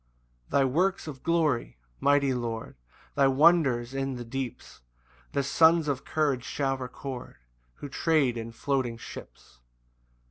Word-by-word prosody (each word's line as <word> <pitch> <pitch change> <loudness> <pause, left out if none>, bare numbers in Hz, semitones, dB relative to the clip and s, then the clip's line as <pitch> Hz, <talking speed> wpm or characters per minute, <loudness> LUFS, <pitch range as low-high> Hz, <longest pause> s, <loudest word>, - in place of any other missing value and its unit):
1 140 - +3
Thy - - +4
works 180 +9 +1
of 140 -5 -8
glory, 155 - 0 0.2
mighty 140 -1 +3
Lord, 115 -2 -4 0.4
Thy 140 - +4
wonders 135 -4 +4
in 135 -1 -2
the 120 -1 -6
deeps, 130 +1 -6 0.5
The 140 - +1
sons 160 +3 +4
of 140 -3 -2
courage 145 -5 0
shall 135 0 -1
record 130 0 -7 0.4
Who - - -8
trade 140 -2 +1
in 115 0 -5
floating 125 -1 -1
ships. - - -12
135 Hz, 135 wpm, -28 LUFS, 125-150 Hz, 0.5 s, Thy